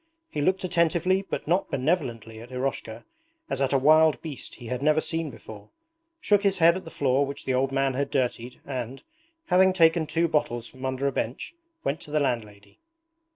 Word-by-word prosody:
He 145 - -2
looked 185 +5 +1
attentively 175 +1 +2
but - - -4
not 185 +4 +1
benevolently 120 - -2
at 120 +2 -12
Eroshka, 125 -3 -4 0.5
as - - -1
at 135 - +1
a 140 - +4
wild 155 +3 +5
beast 155 -5 -8
he 120 - -12
had 125 +2 -3
never 155 +2 +3
seen 160 0 -2
before, 105 -5 -12 0.5
shook 205 -8 +3
his 200 -2 +1
head 170 0 +5
at 185 - -6
the - - -8
floor 135 -2 +1
which 140 0 -6
the 130 - 0
old 130 +1 +1
man 135 0 +1
had 140 +2 -1
dirtied 125 -2 -2
and, 130 -1 -5 0.4
having 185 +1 +4
taken 165 -2 +4
two 170 +2 +1
bottles 145 -7 -1
from 130 +2 -9
under 130 +1 -2
a 140 - +2
bench, 125 - -4 0.3
went 140 +3 -2
to - - -11
the 150 +1 +1
landlady. 105 -7 -3
140 Hz, 195 wpm, -26 LUFS, 125-165 Hz, 0.5 s, wild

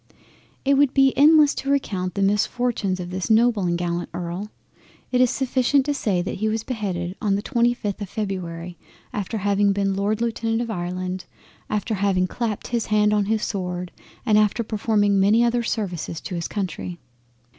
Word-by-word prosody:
It 275 0 +4
would 285 -2 +3
be 270 -1 +4
endless 300 0 +6
to 275 - -4
recount 190 -10 -1
the 200 - +1
misfortunes 205 -1 0
of 180 0 -6
this 185 +3 -3
noble 220 -3 +4
and 175 -1 +1
gallant 175 0 -2
Earl. 175 +4 -4 0.6
It 250 0 +3
is 255 - +5
sufficient 265 +1 +1
to 290 - 0
say 200 -10 0
that - - -4
he 220 +2 0
was 220 0 -1
beheaded 190 -7 -3
on 200 -2 +2
the 200 - -2
25th 235 -5 0
of 200 - -5
Feb, 180 -5 -4 0.4
after 210 +2 -3
having 200 0 +2
been 195 0 0
Lord 205 +2 0
Lieutenant 230 -1 -1
of 235 -1 -2
Ireland, 180 0 -4 0.4
after 215 +2 -1
having 195 -2 +1
clapped 220 +2 -3
his 235 -2 -1
hand 210 0 +3
on 205 -1 +2
his 220 +1 0
sword, 180 -3 -3 0.3
and 215 -3 +4
after 215 +2 +2
performing 205 -2 +1
many 210 +5 +4
other 240 0 +2
services 180 -8 -3
to 190 - -6
his 170 -1 -2
Country. 180 -3 -4
205 Hz, 175 wpm, -23 LUFS, 185-235 Hz, 0.6 s, endless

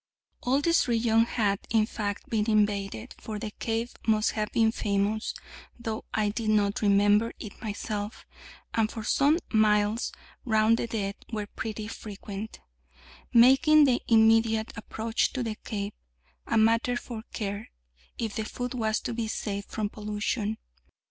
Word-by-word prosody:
All 265 +3 +2
this 335 -1 +3
region 230 -1 +3
had, 205 -4 0
in 220 -2 +3
fact, 205 -2 -4
been 220 -1 0
invaded, 210 +1 0
for 215 -1 -5
the 210 +1 -5
cave 230 +1 -2
must 215 -1 +3
have 210 -1 -2
been 225 -1 +3
famous, 210 0 -1 0.4
though 225 -2 -4
I 215 -1 +1
did 220 +1 -2
not 205 -2 +2
remember 205 +2 +4
it 210 - -9
myself, 210 -1 -4 0.5
and 225 -1 +1
for 220 - -6
some 285 +8 +3 0.2
miles 210 +1 +3 0.3
round 220 -1 +3
the 235 - -2
dead 200 -3 -3
were 210 -2 -2
pretty 215 0 -5
frequent, 210 -1 -7 0.7
making 270 +6 +7
the 255 -4 +3
immediate 225 0 +4
approach 225 +1 -1
to 255 - -1
the 225 -2 -2
cave 205 -1 -5 0.5
a 230 - +1
matter 230 +2 +3
for 235 -2 -6
care, 205 0 -4 0.5
if 225 -3 -3
the 220 - -1
foot 245 +3 -4
was 220 -3 0
to - - -3
be 230 -1 -2
saved 200 -2 -4
from 215 -2 -2
pollution. 210 +1 -2
220 Hz, 150 wpm, -28 LUFS, 210-230 Hz, 0.7 s, making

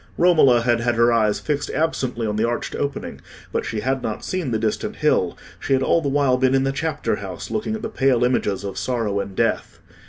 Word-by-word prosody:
Romola 155 -9 +5
had 120 0 +2
had 120 0 0
her 115 +1 +4
eyes 110 -2 +2
fixed 145 -1 -2
absently 130 -6 -1
on 105 -1 -1
the 110 - +1
arched 120 +1 -2
opening, 140 0 -4 0.3
but - - -2
she 110 - -3
had 130 +2 -1
not 110 - -4
seen 185 -7 -2
the 115 - 0
distant 110 -1 -2
hill; - - +1 0.2
she - - -1
had 135 0 +2
all 165 - +3
the 140 - -1
while 135 -2 +2
been 130 +1 +2
in 135 - +3
the 135 - +1
chapter 155 +3 -2
house, 95 -2 -7
looking 215 0 -2
at 220 - -7
the - - -1
pale 135 - +2
images 105 -6 0
of 100 -1 -4
sorrow 110 -3 -1
and 100 -1 -5
death. - - -1
125 Hz, 225 wpm, -22 LUFS, 110-140 Hz, 0.3 s, Romola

